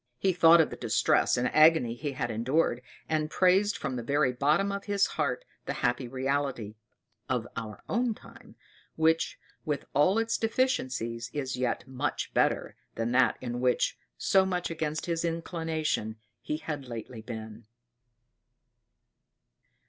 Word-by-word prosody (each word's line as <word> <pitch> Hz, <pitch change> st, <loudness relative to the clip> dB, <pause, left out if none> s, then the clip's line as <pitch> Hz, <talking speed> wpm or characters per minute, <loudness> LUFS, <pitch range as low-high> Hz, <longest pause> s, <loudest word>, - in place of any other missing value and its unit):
He 190 Hz, +5 st, +1 dB
thought 170 Hz, -1 st, +7 dB
of 160 Hz, -, +3 dB
the -, -, -5 dB
distress -, -, +2 dB
and 125 Hz, +1 st, 0 dB
agony 155 Hz, -6 st, +5 dB
he 140 Hz, +3 st, -4 dB
had 120 Hz, -2 st, -2 dB
endured, 125 Hz, +3 st, +1 dB, 0.3 s
and 155 Hz, -1 st, 0 dB
praised 190 Hz, +5 st, +3 dB
from 130 Hz, -, -3 dB
the -, -, -3 dB
very 140 Hz, +1 st, +1 dB
bottom 150 Hz, +10 st, +2 dB
of 200 Hz, 0 st, -4 dB
his 200 Hz, -1 st, +2 dB
heart -, -, -1 dB, 0.2 s
the -, -, -1 dB
happy 125 Hz, +1 st, 0 dB
reality 130 Hz, -4 st, -2 dB, 0.6 s
our 115 Hz, -3 st, -4 dB
own 235 Hz, +1 st, 0 dB
time -, -, -16 dB, 0.4 s
which, 160 Hz, +1 st, +2 dB, 0.3 s
with 150 Hz, -2 st, -2 dB
all 150 Hz, +9 st, +4 dB
its 225 Hz, 0 st, 0 dB
deficiencies, 130 Hz, -, -1 dB
is 135 Hz, -3 st, -2 dB
yet 125 Hz, -2 st, -2 dB
much 130 Hz, +2 st, -3 dB
better -, -, +1 dB, 0.2 s
than 115 Hz, +1 st, -1 dB
that 125 Hz, 0 st, +3 dB
in 120 Hz, -1 st, -4 dB
which, 125 Hz, -1 st, +2 dB, 0.2 s
so 190 Hz, -, +4 dB
much 180 Hz, -2 st, -2 dB
against 155 Hz, -1 st, -2 dB
his 170 Hz, -1 st, -1 dB
inclination, 165 Hz, -8 st, -2 dB, 0.3 s
he 150 Hz, -, -3 dB
had 150 Hz, -3 st, -5 dB
lately 115 Hz, 0 st, -7 dB
been. 110 Hz, -1 st, -8 dB
145 Hz, 140 wpm, -29 LUFS, 120-165 Hz, 0.6 s, thought